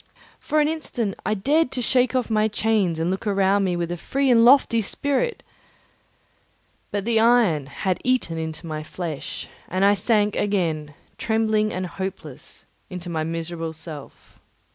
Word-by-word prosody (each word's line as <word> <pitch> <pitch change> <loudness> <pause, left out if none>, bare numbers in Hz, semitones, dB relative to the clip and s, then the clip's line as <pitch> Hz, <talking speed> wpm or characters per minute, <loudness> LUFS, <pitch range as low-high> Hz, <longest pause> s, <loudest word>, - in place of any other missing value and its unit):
For 305 - 0
an 295 - +3
instant 270 -10 -2
I 215 - +1
dared 290 +9 +2
to - - -2
shake 250 +2 +2
off 255 -2 +1
my 215 0 +3
chains 215 -5 +1
and 165 +2 0
look 190 +3 -3
around 195 0 +2
me 180 -2 0
with 175 0 -2
a 175 - -3
free 270 +9 0
and 230 -1 +6
lofty 240 -2 +5
spirit, 285 - -1 1.5
but 205 -1 -3
the 230 -1 +2
iron 220 - +3
had 185 +5 -2
eaten 255 -10 +1
into 160 +1 -5
my 155 -1 -4
flesh, 155 -1 -6 0.2
and 185 +2 +1
I 200 - +6
sank 210 +1 +1
again, 165 -8 -1 0.2
trembling 220 -1 +1
and 185 0 -3
hopeless, 185 -7 -7 0.2
into 180 -1 -6
my 160 -1 -1
miserable 165 0 -4
self. 155 -3 -11
195 Hz, 160 wpm, -23 LUFS, 165-230 Hz, 1.5 s, and